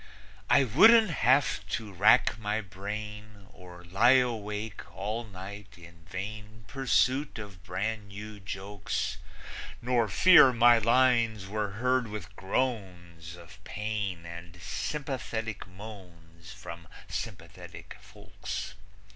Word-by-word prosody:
I 140 Hz, -, +6 dB
wouldn't 215 Hz, -, +6 dB
have 130 Hz, -6 st, +2 dB
to 110 Hz, -3 st, -9 dB
rack 105 Hz, +3 st, +4 dB
my 105 Hz, 0 st, -1 dB
brain 105 Hz, +1 st, -7 dB
Or 90 Hz, -1 st, -13 dB
lie 100 Hz, +9 st, +4 dB
awake 110 Hz, -4 st, -2 dB
all 110 Hz, +4 st, -3 dB
night 100 Hz, -1 st, -10 dB
in 85 Hz, -1 st, -15 dB
vain 105 Hz, +3 st, -7 dB
Pursuit 135 Hz, +1 st, +1 dB
of 100 Hz, -3 st, -10 dB
brand 100 Hz, +3 st, -3 dB
new 105 Hz, +1 st, -9 dB
jokes; 100 Hz, +1 st, -4 dB, 0.6 s
Nor 120 Hz, -2 st, +1 dB
fear 135 Hz, -, +7 dB
my 120 Hz, 0 st, +6 dB
lines 115 Hz, -3 st, +3 dB
were 105 Hz, 0 st, -3 dB
heard 125 Hz, +2 st, +1 dB
with 105 Hz, -5 st, -8 dB
groans 90 Hz, -6 st, -3 dB
Of 90 Hz, +4 st, -15 dB
pain 105 Hz, -6 st, -4 dB
and 85 Hz, +1 st, -10 dB
sympathetic 115 Hz, -, -4 dB
moans 90 Hz, -5 st, -13 dB
From 85 Hz, 0 st, -10 dB, 0.2 s
sympathetic -, -, -8 dB
folks. -, -, -7 dB
105 Hz, 110 wpm, -29 LUFS, 95-115 Hz, 0.6 s, fear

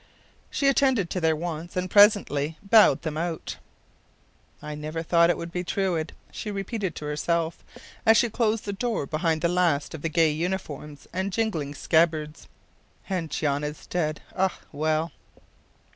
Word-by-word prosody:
She 280 Hz, -, 0 dB
attended 265 Hz, -9 st, +3 dB
to 180 Hz, -, -2 dB
their 160 Hz, -1 st, +3 dB
wants, 170 Hz, +1 st, -5 dB
and 180 Hz, 0 st, 0 dB
presently 185 Hz, -7 st, +4 dB
bowed 215 Hz, +2 st, +5 dB
them 155 Hz, -2 st, -3 dB
out. 165 Hz, -1 st, -3 dB, 1.0 s
“I 150 Hz, 0 st, -6 dB
never 155 Hz, +2 st, -4 dB
thought 170 Hz, 0 st, +4 dB
it 175 Hz, -, +2 dB
would 170 Hz, 0 st, -6 dB
be 180 Hz, +1 st, -2 dB
Truide,” 175 Hz, -3 st, -1 dB, 0.2 s
she 215 Hz, -, -5 dB
repeated 200 Hz, -2 st, -3 dB
to 150 Hz, -, -6 dB
herself, 165 Hz, +2 st, -1 dB, 0.4 s
as 225 Hz, 0 st, +6 dB
she 240 Hz, -, +4 dB
closed 220 Hz, -1 st, 0 dB
the 200 Hz, -, -3 dB
door 230 Hz, -, -1 dB
behind 160 Hz, +2 st, 0 dB
the 170 Hz, -, +3 dB
last 170 Hz, -5 st, +1 dB
of 160 Hz, -, -7 dB
the 165 Hz, -, -1 dB
gay 160 Hz, -1 st, +3 dB
uniforms 150 Hz, -3 st, -4 dB
and 190 Hz, +2 st, -1 dB
jingling 170 Hz, -10 st, -1 dB
scabbards. 155 Hz, -1 st, +1 dB, 0.6 s
“And 175 Hz, -4 st, -1 dB
Jan 145 Hz, -2 st, -1 dB
is 150 Hz, +1 st, -5 dB
dead 155 Hz, -3 st, -2 dB
ah, 190 Hz, 0 st, +1 dB
well! 155 Hz, +2 st, 0 dB
170 Hz, 160 wpm, -26 LUFS, 155-190 Hz, 1.0 s, as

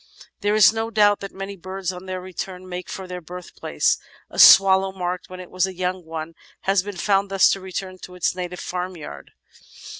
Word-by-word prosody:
There 205 Hz, 0 st, +1 dB
is 215 Hz, -1 st, +7 dB
no 225 Hz, 0 st, -2 dB
doubt 205 Hz, -2 st, +4 dB
that 195 Hz, -, -7 dB
many 195 Hz, +1 st, -7 dB
birds 185 Hz, 0 st, -5 dB
on 180 Hz, +1 st, -10 dB
their 185 Hz, 0 st, -4 dB
return 185 Hz, 0 st, -7 dB
make 180 Hz, 0 st, -6 dB
for 190 Hz, -, -6 dB
their 180 Hz, -1 st, -7 dB
birthplace. 180 Hz, +2 st, -2 dB, 0.3 s
A -, -, -6 dB
swallow 190 Hz, 0 st, +8 dB
marked 180 Hz, -1 st, -4 dB
when 185 Hz, 0 st, -9 dB
it 180 Hz, -, -10 dB
was 185 Hz, +1 st, +1 dB
a 190 Hz, -, -8 dB
young 180 Hz, 0 st, -2 dB
one 160 Hz, 0 st, -6 dB, 0.3 s
has 195 Hz, -1 st, +2 dB
been 200 Hz, 0 st, -7 dB
found 195 Hz, +2 st, +1 dB
thus 195 Hz, -1 st, +5 dB
to 195 Hz, -, -1 dB
return 185 Hz, 0 st, -6 dB
to 180 Hz, -, -11 dB
its 180 Hz, -, 0 dB
native 180 Hz, 0 st, -5 dB
farmyard. 180 Hz, -, -6 dB
185 Hz, 200 wpm, -22 LUFS, 180-195 Hz, 0.3 s, swallow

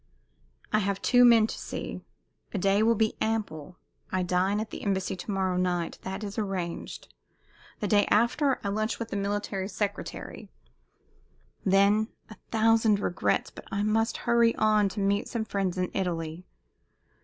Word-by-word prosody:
I 215 Hz, -, +5 dB
have 200 Hz, -1 st, -1 dB
two 245 Hz, -1 st, +5 dB
men 230 Hz, -3 st, +7 dB
to -, -, -5 dB
see. -, -, -6 dB, 0.5 s
A -, -, +1 dB
day 195 Hz, +2 st, +2 dB
will 230 Hz, +1 st, +4 dB
be 220 Hz, 0 st, +1 dB
ample. 185 Hz, -7 st, -2 dB, 0.3 s
I 185 Hz, -1 st, 0 dB
dine 185 Hz, +3 st, +1 dB
at 215 Hz, 0 st, -4 dB
the -, -, -7 dB
Embassy 190 Hz, -1 st, -1 dB
to 185 Hz, -, -9 dB
morrow 190 Hz, -2 st, 0 dB
night 175 Hz, -2 st, -1 dB
that 190 Hz, +2 st, -5 dB
is 205 Hz, +1 st, -4 dB
arranged; 190 Hz, -5 st, -4 dB, 0.7 s
the 210 Hz, -, 0 dB
day 205 Hz, 0 st, +3 dB
after 250 Hz, +5 st, +2 dB
I 200 Hz, -, -1 dB
lunch 215 Hz, +2 st, -1 dB
with 230 Hz, -1 st, -5 dB
the -, -, -4 dB
Military 200 Hz, -1 st, -2 dB
Secretary; 205 Hz, 0 st, -5 dB, 1.1 s
then 200 Hz, +3 st, +4 dB, 0.2 s
a -, -, -9 dB
thousand 225 Hz, -2 st, +3 dB
regrets, 180 Hz, -, 0 dB
but -, -, -12 dB
I 200 Hz, +1 st, -1 dB
must 225 Hz, +2 st, +1 dB
hurry 235 Hz, -1 st, +4 dB
on 215 Hz, -2 st, +3 dB
to 195 Hz, -, -6 dB
meet 200 Hz, +1 st, +1 dB
some 225 Hz, -2 st, -3 dB
friends 195 Hz, -3 st, -2 dB
in 180 Hz, 0 st, -1 dB
Italy. 170 Hz, -2 st, -3 dB
200 Hz, 160 wpm, -28 LUFS, 190-220 Hz, 1.1 s, men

